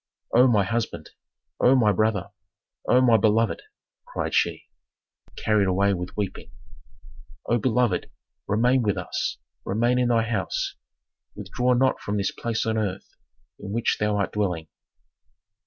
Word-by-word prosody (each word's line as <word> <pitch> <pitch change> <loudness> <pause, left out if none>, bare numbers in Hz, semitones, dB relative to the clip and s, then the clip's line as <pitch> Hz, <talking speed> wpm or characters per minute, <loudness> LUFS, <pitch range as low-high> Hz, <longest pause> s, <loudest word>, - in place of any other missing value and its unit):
"O 125 +2 +6
my 105 -5 +3
husband! 115 +4 -3 0.5
O 130 +2 +5
my 110 -5 +4
brother! 105 -1 0 0.6
O 125 - +5
my 120 -3 +5
beloved!" 110 +1 +2 0.4
cried - - -4
she, - - +1 0.7
carried 105 -3 +1
away 100 +2 +2
with 90 +1 -6
weeping. 100 -3 -4 1.0
"O 120 - +1
beloved, 120 -5 +1 0.4
remain 120 +5 +2
with 105 -4 0
us, - - -3 0.3
remain 120 +5 +1
in 125 - +2
thy 115 -2 +2
house, 110 -4 -2 0.6
withdraw 125 +5 0
not 130 +1 +2
from 105 +1 -2
this 100 -1 0
place 115 -1 -3
on 110 0 0
earth 95 -3 -4 0.4
in 100 0 -7
which 115 +1 0
thou 105 -1 +1
art 100 - -1
dwelling!" 90 -6 -2
110 Hz, 140 wpm, -24 LUFS, 100-120 Hz, 1.0 s, O